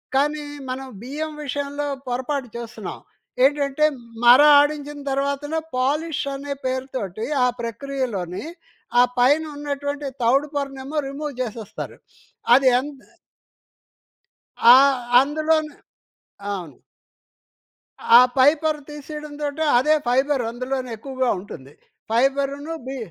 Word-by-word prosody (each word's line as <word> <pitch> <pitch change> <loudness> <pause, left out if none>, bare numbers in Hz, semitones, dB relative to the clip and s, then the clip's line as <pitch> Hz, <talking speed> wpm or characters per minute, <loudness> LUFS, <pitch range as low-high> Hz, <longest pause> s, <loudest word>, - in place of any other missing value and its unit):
కానీ 295 +2 +1 0.3
మనం 265 +1 -5
బియ్యం 300 +6 -5
విషయంలో 285 +1 -3 0.2
పొరపాటు 260 +2 -2
చేస్తున్నాం. 235 0 -7 0.5
ఏంటంటే 285 +1 +2 0.4
మర 245 +3 +9 0.2
ఆడించిన 290 0 -2
తర్వాతనే 280 +3 -1 0.2
పాలిష్ 295 +5 0
అనే 280 +1 -5
పేరుతోటి, 255 -6 -3 0.2
ఆ - - +4
ప్రక్రియలోని 235 - -4 0.5
ఆ - - +8 0.2
పైన 285 +6 +4
ఉన్నటువంటి 285 0 -4 0.2
తౌడు 270 +6 +3
పొరనేమో 275 +1 -3
రిమూవ్ 285 +1 -5
చేసేస్తారు. 220 -3 -6 0.6
అది 265 0 +4
ఎంత 275 0 -8 1.6
ఆ! 235 - +8 0.5
అందులోనే 310 +2 +1 0.8
అవును. 175 -8 -7 1.4
ఆ - - +10 0.2
పై 260 +2 +8
పొర 315 -1 +1
తీసేయడంతోటే 295 0 -5
అదే 295 +5 +3
ఫైబర్ 265 +2 +2
అందులోనే 255 +2 -4
ఎక్కువగా 260 +2 -2
ఉంటుంది. 145 -8 -11 0.4
ఫైబర్‌ను 275 +5 0
బి 270 +1 -4
275 Hz, 100 wpm, -22 LUFS, 255-290 Hz, 1.6 s, ఆ